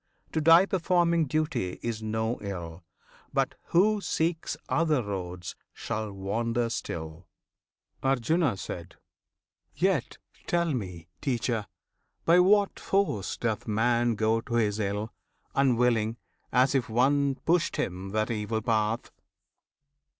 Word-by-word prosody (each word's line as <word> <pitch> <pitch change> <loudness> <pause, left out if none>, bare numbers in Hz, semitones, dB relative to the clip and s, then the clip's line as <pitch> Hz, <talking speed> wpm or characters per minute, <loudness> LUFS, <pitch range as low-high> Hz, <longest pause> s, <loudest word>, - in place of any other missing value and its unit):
To 160 - 0
die 165 +4 +7
performing 170 -3 +2
duty 155 - -1
is 115 -2 -3
no 110 +2 -1
ill; 90 -4 -6 0.5
But - - +1
who 205 +4 +3
seeks 165 -2 -1
other 155 -6 +2
roads 90 -3 -5 0.2
shall 110 -1 -4
wander 115 +5 -1
still. 80 -5 -5 0.7
Arjuna. 135 - +1 1.2
Yet - - 0 0.3
tell 170 -2 +1
me, 90 -8 -5
Teacher! 120 -4 -1 0.6
by 170 +2 +6
what 200 +2 +4
force 195 - 0
doth 110 -3 -2
man 120 +2 +2
Go 110 +1 +1
to 120 0 -4
his 110 -2 +1
ill, 105 +1 -2 0.4
unwilling; 120 -4 +2 0.3
as 130 +2 +4
if 130 -4 0
one 135 +4 +2
Pushed 170 +5 +1
him 95 +1 -3
that 110 +3 0
evil 110 0 -2
path? 110 0 0
115 Hz, 115 wpm, -28 LUFS, 105-155 Hz, 1.2 s, die